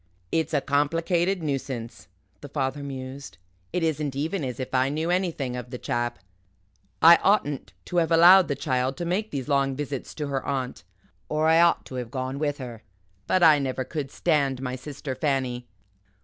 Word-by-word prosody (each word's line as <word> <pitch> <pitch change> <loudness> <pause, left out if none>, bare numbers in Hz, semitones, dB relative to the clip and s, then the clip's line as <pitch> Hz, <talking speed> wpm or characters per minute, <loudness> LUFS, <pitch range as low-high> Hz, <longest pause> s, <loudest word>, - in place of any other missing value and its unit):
"It's 160 -1 0
a 140 - +2
complicated 165 +6 +1
nuisance," 130 -5 -4 0.3
the 145 - -10
father 135 0 -2
mused; 135 -4 -7 0.3
"it 180 - -1
isn't 150 -3 -1
even 160 +5 -2
as 125 -1 -4
if 130 - -5
I 130 +1 +3
knew 160 +4 -1
anything 165 -9 -1
of 125 -1 -6
the 125 - -6
chap. 120 -3 -2 0.9
I 170 +1 +10
oughtn't 150 -9 +1
to 180 - -3
have 165 -1 +2
allowed 175 +3 +8
the 140 - -1
child 130 -2 -1
to 175 - -3
make 195 +5 -1
these 135 -2 -4
long 140 -2 +1
visits 140 -2 -5
to 150 - -3
her 140 -2 -2
aunt. 130 -8 -3 0.5
Or 155 +1 +1
I 165 +1 +6
ought 170 0 +3
to 130 - -9
have 120 - -8
gone 130 +2 -4
with 145 -1 -1
her. 120 -4 -8 0.5
But 185 - +2
I 155 -3 +7
never 130 -1 -2
could 140 +1 -5
stand 140 -5 +1
my 130 -1 -3
sister 140 +1 -6
Fanny. 130 -3 -1
140 Hz, 180 wpm, -25 LUFS, 130-160 Hz, 0.9 s, I